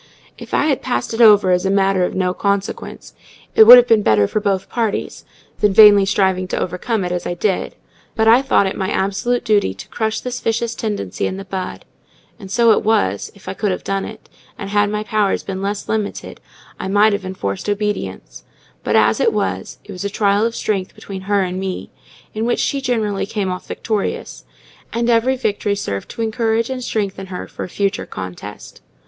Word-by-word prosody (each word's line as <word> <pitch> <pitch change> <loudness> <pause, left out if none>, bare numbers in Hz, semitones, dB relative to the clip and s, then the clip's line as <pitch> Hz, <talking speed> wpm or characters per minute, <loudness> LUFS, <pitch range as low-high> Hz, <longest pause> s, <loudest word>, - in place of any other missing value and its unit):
If - - -12
I - - +2
had 285 -4 +1
passed 120 - -2
it 225 - 0
over 205 -4 +6
as 180 0 +2
a 195 - 0
matter 195 -1 +2
of - - -2
no 180 -1 0
consequence, 200 0 -3 0.4
it 220 - +7
would 245 +3 +12
have 245 - +6
been 225 -2 +4
better 105 - +3
for 215 - -1
both 195 -2 -1
parties, 225 -3 -3 0.3
than 210 -2 +3
vainly 205 -2 +8
striving 190 -2 +1
to - - -2
overcome 185 +3 -2
it 180 - -3
as 180 0 -3
I 175 - -3
did; 190 +1 -1 0.4
but 220 -1 +2
I 235 +3 +7
thought 265 -6 +2
it 190 - -2
my 190 -1 -2
absolute 210 +6 -1
duty 205 - +2
to 95 - -10
crush 220 -1 -2
this 250 0 -5
vicious 230 +1 -1
tendency 205 - -3
in 190 - -4
the 195 - -8
bud: 190 -1 -5 0.5
and 195 -3 -10
so 230 +3 +4
it - - +3
was, 100 - 0
if 200 - -18
I 185 - -3
could 205 +2 -1
have 185 - -3
done 195 0 -2
it; 220 - -10 0.3
and 200 0 -6
had 205 0 +2
my 210 0 -2
powers 215 -2 0
been 190 -1 -5
less 200 +1 -3
limited, 215 -2 -4 0.4
I - - -4
might 205 +2 +4
have 200 -1 -2
enforced 185 - -4
obedience; 210 0 -3 0.4
but, - - 0
as - - +3
it 460 - +3
was, - - -3
it - - -11
was 185 0 -6
a 200 - -2
trial 205 +1 +2
of 230 - -6
strength 195 -3 -2
between 195 -1 -8
her 200 -1 +3
and 185 0 -3
me, 190 -1 -5 0.4
in 220 +1 -2
which 240 - 0
she 280 -1 0
generally 220 -7 -1
came 200 -3 -2
off 180 - -6
victorious; 215 -3 -4 0.5
and 235 +1 0
every 235 +3 +3
victory 205 -3 -1
served 100 - -4
to 230 - -4
encourage 225 +1 0
and 255 -1 -4
strengthen 195 -4 -3
her 185 -1 -6
for - - -7
a - - -11
future 200 +2 -2
contest. 95 +2 -9
205 Hz, 205 wpm, -19 LUFS, 190-220 Hz, 0.5 s, would